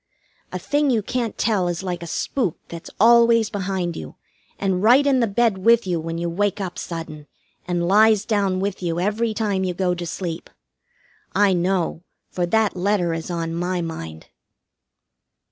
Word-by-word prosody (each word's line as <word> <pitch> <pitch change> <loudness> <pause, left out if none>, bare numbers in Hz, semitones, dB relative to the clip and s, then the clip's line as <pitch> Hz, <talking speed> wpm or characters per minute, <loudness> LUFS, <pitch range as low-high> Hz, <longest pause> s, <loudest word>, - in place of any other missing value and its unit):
A - - -3
thing 290 0 0
you 225 -5 +1
can't 235 -1 -3
tell 205 -6 +1
is 175 +1 -3
like 180 -2 -4
a 170 - -6
spook 195 - -2
that's 170 -1 -8
always 230 0 +5
behind 190 -4 -2
you, - - -8 0.4
and 190 -2 -1
right 250 +7 +5
in 275 -2 +3
the 235 - +2
bed 220 -1 +1
with 230 +3 +4
you 175 -3 -1
when 165 +1 -4
you 170 +1 -2
wake 200 +4 -1
up 190 -3 -5
sudden, 165 -3 -7 0.4
and 175 -1 -1
lies 215 +2 +4
down 200 -4 0
with 195 0 -3
you 170 -1 -2
every 215 +4 0
time 205 -3 0
you 180 -1 -2
go 180 -1 0
to 175 -1 -5
sleep. 165 -1 -5 0.9
I 200 -1 +4
know, 180 -2 0 0.3
for 175 -1 -1
that 220 +2 +1
letter 180 -2 0
is 165 +1 -5
on 165 -1 -3
my 175 +1 -2
mind. 80 - -7
190 Hz, 175 wpm, -22 LUFS, 170-215 Hz, 0.9 s, always